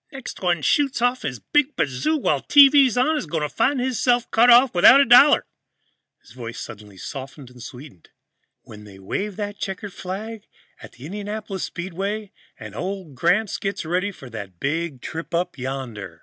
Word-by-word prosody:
"Next 270 -3 -9
one 175 -4 0
shoots 280 -3 +1
off 245 +1 +1
his 125 - -4
big 295 - 0
bazoo 160 - -1
while 285 - 0
the - - -21
TV's 280 -3 +6
on 265 +6 +2
is 245 - -3
gonna 150 -1 -2
find 250 - 0
hisself 245 -1 0
cut 235 +2 +4
off 245 +1 +6
without 185 +10 +7
a 280 - +5
dollar 250 +5 +6 0.4
" - - -49
his - - -19
voice 120 -1 -8
suddenly 105 -3 -10
softened 135 +3 -9
and 125 -1 -15
sweetened 125 - -12 0.5
"when 105 -1 -13
they 100 -2 -14
wave 190 - -4
that 205 0 -5
checkered 195 0 -5
flag 205 +4 -7 0.3
at - - -12
the 125 - -12
Indianapolis 205 +1 -5
Speedway, 195 +4 -5 0.3
and - - -10
old 185 -5 -6
Gramps 190 +10 +1
gets 195 -3 -4
ready 180 +5 -1
for 140 -8 -13
the 110 -5 -8
Big 150 -2 -3
Trip 165 +1 -6
Up 175 +1 -1
Yonder." 120 - -6
185 Hz, 175 wpm, -22 LUFS, -, 0.5 s, without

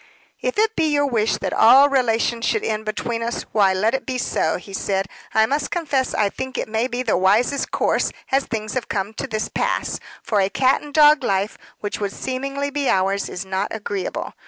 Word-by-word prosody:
"If - - -2
it 440 +1 +2
be 325 - +2
your 285 -1 +2
wish 225 -5 +1
that - - -3
all 270 +5 +7
relations 235 -3 +1
should 435 - +1
end 220 0 -2
between 230 +2 -3
us, 235 +1 -3
why, 200 -3 +4
let 205 +5 +1
it 265 - -1
be 260 -1 -3
so," 160 -9 0
he 195 +2 -12
said. 195 0 -1 0.3
"I 220 - +4
must 285 +4 -1
confess 285 -6 -1
I 210 - +2
think 260 +6 -5
it - - -2
may 220 +3 0
be 250 0 -3
the 225 - +1
wisest 210 +10 +2
course, - - +1 0.2
as 270 +1 +2
things 215 -1 -4
have 255 -3 -3
come 200 +1 -2
to 245 - -4
this 215 -3 -2
pass; - - -1 0.2
for 210 -3 +1
a 190 - +1
cat 260 +5 +2
and 295 - -10
dog 300 -1 +6
life, 195 -1 0 0.3
which 205 - -4
would 200 -1 -2
seemingly 275 +2 -3
be 285 -2 -1
ours, 195 +1 +1
is 180 - -5
not 190 +2 -1
agreeable. 205 -3 -4
230 Hz, 210 wpm, -21 LUFS, 205-275 Hz, 0.3 s, all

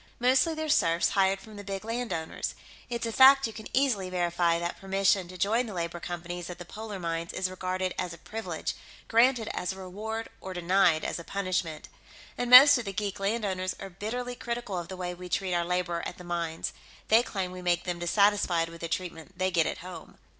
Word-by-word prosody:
Mostly 260 +6 +3
they're 315 0 -3
serfs 170 - +3
hired 195 0 +2
from 215 -1 -12
the 205 - -7
big 195 +1 -5
landowners; 225 -8 -3 0.3
it's 235 -1 -2
a 230 - -2
fact 270 +3 +7
you 225 - -4
can 220 - -8
easily 245 -9 +1
verify 175 -1 +1
that 170 +1 -4
permission 195 -1 +2
to 185 +1 -10
join 225 +7 +1
the 210 - -7
labor 170 0 -3
companies 175 0 -5
at 180 - -7
the 175 - -9
polar 215 +2 -7
mines 170 -1 -3
is 185 0 -1
regarded 185 0 -2
as 180 - -2
a 165 - -9
privilege, 220 +6 -4 0.3
granted 235 0 +4
as 180 - -2
a 190 - -8
reward 215 +4 -5
or 190 -1 -7
denied 175 -2 +3
as - - -2
a - - -7
punishment. 185 -4 -2 0.5
And 245 - -2
most 260 +2 +10
of 235 - -5
the 195 - -4
geek 200 0 -3
landowners 195 -3 -1
are 195 -1 -7
bitterly 245 +6 -4
critical 235 -4 -4
of 170 - -6
the 190 - -7
way 180 -1 -3
we 180 0 -9
treat 185 0 -1
our 175 0 +2
labor 175 -1 -1
at - - -6
the 180 - -10
mines; 170 -2 -3 0.4
they 225 +2 +7
claim 190 -6 -3
we 185 0 -8
make 175 -1 +1
them 175 -2 -3
dissatisfied 175 -2 +2
with 165 0 -12
the 170 - -3
treatment 170 0 -5
they 185 0 +1
get 170 -3 +3
at - - -3
home." 185 -1 -10
185 Hz, 210 wpm, -28 LUFS, 175-220 Hz, 0.5 s, most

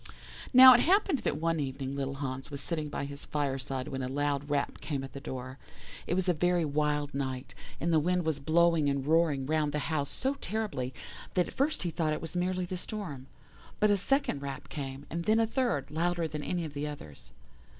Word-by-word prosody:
"Now 255 0 +11
it - - +5
happened 375 -4 +3
that 145 - -1
one 165 +1 0
evening 135 -1 -3
little 135 0 -2
Hans 135 0 -4
was 140 -1 -5
sitting 155 -1 -3
by 145 - -3
his 140 0 -7
fireside 135 -3 -2
when 135 -1 -3
a 130 - -2
loud 145 +1 -1
rap 145 -1 -1
came 140 -3 -3
at 135 - -8
the 140 - -6
door. 130 0 -7 0.5
It 175 - +1
was 185 0 0
a 180 - +4
very 175 +1 +2
wild 150 0 0
night, 130 -2 -3 0.3
and 170 +1 0
the 160 - +6
wind 180 +2 +1
was 155 -3 0
blowing 160 0 +3
and 140 -1 -1
roaring 155 -3 +3
round 150 0 0
the - - 0 0.2
house 145 -2 0
so 265 +2 -1
terribly 205 - -2 0.4
that 180 -2 +3
at - - -11
first 285 -2 +1
he 175 - -1
thought 155 -1 0
it - - -2
was 165 +1 -6
merely 180 +1 0
the 185 +1 -4
storm. 175 - -6 0.5
But 210 0 +4
a - - +5
second 235 - +1
rap 140 -1 -6
came, 135 -1 -6
and 170 +1 -3
then 220 +1 +4
a 225 - +4
third, 225 - -1
louder 170 +1 0
than 150 -1 -5
any 175 +2 -2
of 150 - -7
the 145 +1 -3
others. 75 - -9
150 Hz, 215 wpm, -30 LUFS, 140-175 Hz, 0.5 s, Now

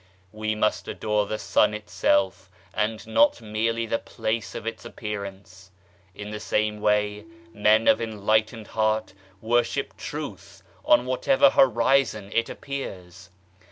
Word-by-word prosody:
We 110 +1 -2
must 105 0 0
adore 105 -1 -1
the 110 - -2
Sun 105 0 +2
itself 95 -1 0 0.2
and 110 +1 -1
not 290 0 +3
merely 115 +1 -1
the 115 0 -1
place 110 -1 -3
of - - -6
its 115 -1 -5
appearance. 100 -4 -7 0.5
In 105 0 -7
the 105 - -5
same 105 0 -1
way 105 0 +1 0.3
men 110 +1 +3
of - - +5
enlightened 110 +1 0
heart 110 -1 0 0.3
worship 120 +2 0
Truth - - -7 0.2
on 120 +1 +4
whatever 270 - +3
horizon 120 - +3
it 115 0 +1
appears. 90 -10 -7
110 Hz, 125 wpm, -25 LUFS, 105-115 Hz, 0.5 s, of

